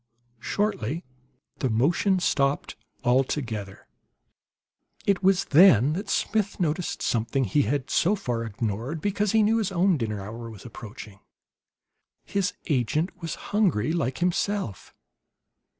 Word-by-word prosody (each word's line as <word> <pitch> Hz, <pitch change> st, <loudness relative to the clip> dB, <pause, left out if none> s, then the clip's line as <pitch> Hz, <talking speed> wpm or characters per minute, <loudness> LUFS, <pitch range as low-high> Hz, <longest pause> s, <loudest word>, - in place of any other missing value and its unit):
Shortly 170 Hz, -, -1 dB, 0.6 s
the 130 Hz, -, 0 dB
motion 165 Hz, -, +2 dB
stopped 140 Hz, -5 st, 0 dB, 0.3 s
altogether. 120 Hz, -6 st, -1 dB, 1.2 s
It 200 Hz, -3 st, +2 dB
was 195 Hz, 0 st, +3 dB
then 150 Hz, -, +6 dB
that 200 Hz, +4 st, -4 dB
Smith 210 Hz, -2 st, 0 dB
noticed 170 Hz, 0 st, -1 dB
something 120 Hz, +4 st, 0 dB
he 125 Hz, +6 st, +2 dB
had 140 Hz, -1 st, -1 dB
so 195 Hz, +5 st, +3 dB
far 120 Hz, -, -3 dB
ignored 115 Hz, +6 st, -3 dB
because 205 Hz, +3 st, 0 dB
he 220 Hz, -1 st, +5 dB
knew 220 Hz, +2 st, +3 dB
his 205 Hz, -3 st, -1 dB
own 185 Hz, -1 st, +3 dB
dinner 110 Hz, -5 st, -3 dB
hour 115 Hz, +4 st, -7 dB
was 105 Hz, -4 st, -12 dB
approaching. 105 Hz, -2 st, -10 dB, 1.1 s
His 195 Hz, -2 st, -1 dB
agent 155 Hz, -, -1 dB
was 165 Hz, -2 st, -4 dB, 0.2 s
hungry, 165 Hz, -, +2 dB
like 135 Hz, -6 st, -1 dB
himself. 180 Hz, -, -1 dB
150 Hz, 120 wpm, -26 LUFS, 115-190 Hz, 1.2 s, then